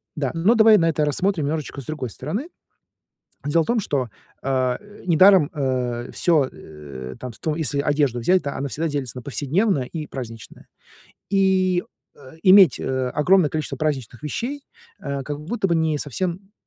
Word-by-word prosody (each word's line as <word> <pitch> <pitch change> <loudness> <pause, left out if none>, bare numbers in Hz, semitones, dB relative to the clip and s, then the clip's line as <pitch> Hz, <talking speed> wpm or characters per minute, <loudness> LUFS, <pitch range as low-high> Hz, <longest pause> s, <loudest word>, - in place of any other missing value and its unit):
да, 140 -4 -1
но 175 +8 +3
давай 220 -1 +7
на 165 -3 +2
это 155 -1 0
рассмотрим 165 +2 0
немножечко 150 -1 -3
с - - -12
другой 150 -4 -4
стороны. 175 - -4 1.0
Дело 165 +3 +3
в - - -7
том, 235 0 +1
что, 140 - -1 0.3
а, 130 -2 0
э, 210 0 -16
недаром, 185 -1 +6
э, 125 -4 -2
всё, 155 -6 +2
э, 70 -4 -10
там 125 - -6
то 155 - -1
если 150 -3 -1
одежду 145 -4 +1
взять, 180 +10 +2
да, 140 - -4
она 140 - -3
всегда 160 +5 -2
делится 140 -5 -4
на 125 - -6
повседневное 145 - 0
и 155 +4 -6
праздничное, 115 -6 -9 0.6
и, 190 -2 +2 0.3
а, 130 -1 -14
иметь, 190 -5 +7
э, 130 -1 -2
огромное 165 +2 +3
количество 155 -3 -3
праздничных 130 -5 -3
вещей, 245 - -4 0.4
э, 140 -4 -4
как 145 +2 -5
будто 195 +7 -2
бы 170 - +2
не 160 -2 +1
совсем 180 - -4
150 Hz, 170 wpm, -22 LUFS, 130-185 Hz, 1.0 s, давай